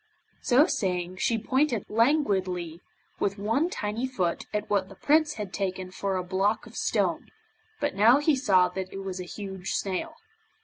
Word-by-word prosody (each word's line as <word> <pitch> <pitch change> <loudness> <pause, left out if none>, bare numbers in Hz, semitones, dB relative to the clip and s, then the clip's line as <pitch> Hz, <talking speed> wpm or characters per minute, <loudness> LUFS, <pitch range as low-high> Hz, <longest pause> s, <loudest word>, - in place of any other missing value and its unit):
So 275 +2 +5
saying, 180 - -2
she 235 +2 +1
pointed 255 +1 +1
languidly 190 - +1 0.4
with 200 +1 0
one 225 - +1
tiny 225 -3 -2
foot 185 -10 -2
at 210 0 -2
what 195 -2 0
the 195 - -12
Prince 305 +6 +2
had 205 -3 -6
taken 185 -2 -3
for 195 0 -2
a 185 - -2
block 195 +4 0
of - - -14
stone, - - 0 0.5
but 290 - -1
now 220 +6 +6
he 295 +1 +3
saw 190 -8 +4
that 185 +1 -5
it 195 - -6
was 190 -1 -5
a 180 - -5
huge 190 0 -5
snail. 200 - -2
200 Hz, 170 wpm, -27 LUFS, 185-250 Hz, 0.5 s, now